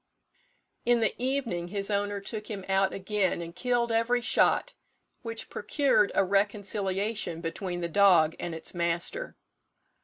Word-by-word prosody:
In 240 0 +3
the 220 -3 +2
evening 255 -10 -1
his 200 +2 -3
owner 205 0 0
took 210 +1 -6
him 200 -3 -5
out 195 0 +2
again 195 -1 -1
and 170 0 -7
killed 240 +1 0
every 230 +2 +2
shot, - - +2 0.5
which 230 -2 -4
procured 260 -2 +2
a 195 - +4
reconciliation 200 -1 -1
between 175 +2 -4
the 170 - -1
dog 170 -3 +5
and 170 -2 -4
its 160 - -5
master. 170 - -2
200 Hz, 135 wpm, -28 LUFS, 180-230 Hz, 0.5 s, dog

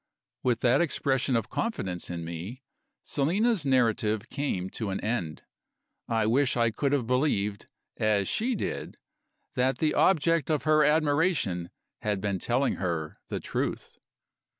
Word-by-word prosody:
With 125 -2 +1
that 125 +4 +4
expression 135 -5 +1
of 115 -2 -1
confidence 95 - -3
in 85 -2 -4
me, 90 +11 -7 0.4
Selina's 185 - +1
narrative 115 -4 +2
came 140 -11 -2
to 110 -3 -4
an 95 - -2
end. 95 -9 -2 0.6
I 115 -1 +1
wish 130 +4 +2
I 115 -1 +3
could 140 +5 -1
have 140 -5 +1
believed, 110 -6 0 0.3
as 105 -3 +2
she 240 +3 0
did, - - -4 0.6
that 130 -1 +1
the 155 +1 +1
object 165 -4 +3
of 155 -2 +1
her 155 -1 +4
admiration 150 - +2 0.3
had 105 -2 -1
been 100 -1 -1
telling 125 +7 0
her 85 -4 -3
the - - -3
truth. - - -4
125 Hz, 140 wpm, -28 LUFS, 100-145 Hz, 0.6 s, that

